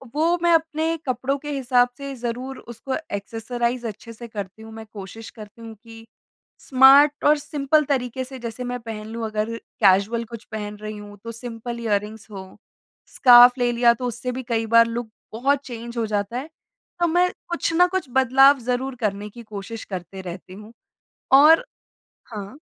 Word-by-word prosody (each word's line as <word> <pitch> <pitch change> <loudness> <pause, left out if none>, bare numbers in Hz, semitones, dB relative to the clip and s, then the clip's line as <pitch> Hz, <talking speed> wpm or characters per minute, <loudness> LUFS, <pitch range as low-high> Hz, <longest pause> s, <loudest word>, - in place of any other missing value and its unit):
वो 335 +3 +2
मैं 345 -1 +4
अपने 325 0 +1
कपड़ों 255 +3 -1
के 295 +1 -6
हिसाब 250 -3 +2
से 275 -1 -6
ज़रूर 250 +2 -5
उसको 240 +3 -6 0.2
एक्सेसराइज़ 235 +3 -3
अच्छे 220 +2 -9
से 235 +2 -10
करती 205 -1 -7
हूँ। 220 0 -11
मैं 220 0 -9
कोशिश 210 +2 -9
करती 215 0 -13
हूँ 225 -1 -9
कि 225 0 -13 0.5
स्मार्ट 275 +2 +6
और 300 +1 +5
सिंपल 295 +1 0
तरीके 260 -2 -2
से 260 0 -10
जैसे 235 +1 -6
मैं 245 0 -4
पहन 220 -2 -7
लूँ 225 +1 -5
अगर 215 +1 -2 0.3
कैजुअल 200 +4 +3
कुछ 230 0 -10
पहन 210 -1 -5
रही 215 0 -7
हूँ 205 0 -11
तो 230 - -6
सिंपल 235 0 -7
इयररिंग्स 215 0 -2
हो, 190 -1 -10 0.5
स्कार्फ 245 0 +7
ले 245 -1 +1
लिया 235 0 +4
तो 250 +2 -6
उससे 245 +1 -4
भी 255 +1 -5
कई 225 -1 0
बार 230 +1 +6
लुक 230 0 -4 0.2
बहुत 275 +5 +1
चेंज़ 235 -1 -8
हो 225 - 0
जाता 205 +2 -2
है। 275 +5 -6 0.5
तो 345 - +2
मैं 355 +2 +3 0.2
कुछ 345 -1 -1
ना 355 +2 +5
कुछ 375 +1 -2
बदलाव 265 +2 +5
ज़रूर 250 +2 -2
करने 205 -1 -2
की 235 +3 -12
कोशिश 215 +1 -8
करते 190 0 -7
रहती 185 0 -9
हूँ। 210 +3 -12 0.6
और 305 - +7 0.7
हाँ। 205 +4 -7
235 Hz, 175 wpm, -23 LUFS, 215-265 Hz, 0.7 s, स्कार्फ